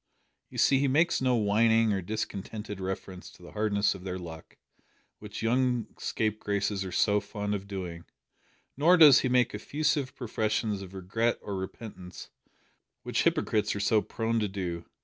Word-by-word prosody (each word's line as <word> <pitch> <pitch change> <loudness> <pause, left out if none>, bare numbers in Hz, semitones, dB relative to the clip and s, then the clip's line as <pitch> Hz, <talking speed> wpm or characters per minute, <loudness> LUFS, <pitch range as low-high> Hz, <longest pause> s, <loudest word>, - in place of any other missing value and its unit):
"You - - -10
see 135 - +4
he 140 - +2
makes 155 +5 +2
no 130 -1 +3
whining 110 +1 +3
or 95 - -1
discontented 105 +1 -5
reference 95 -1 -5
to - - -18
the 85 - -11
hardness 105 -1 +1
of 90 - -10
their 95 -1 -4
luck, 80 -3 -10 0.6
which 105 +1 -7
young 125 0 +1
scapegraces 105 -2 -1
are 95 - -6
so 105 +3 +3
fond 105 +1 -4
of 100 -1 -4
doing; 90 -4 -6 0.7
nor 165 +6 +5
does 150 -5 +9
he 130 - 0
make 125 -1 +3
effusive 145 +4 -1
professions 110 -3 -1
of 95 0 -10
regret 115 +6 0
or 100 - -4
repentance, 95 -1 -8 0.7
which - - 0
hypocrites 105 -1 +1
are - - -3
so 105 +1 +3
prone 115 +1 -1
to 105 - 0
do. 90 -4 -4
105 Hz, 160 wpm, -29 LUFS, 95-115 Hz, 0.7 s, does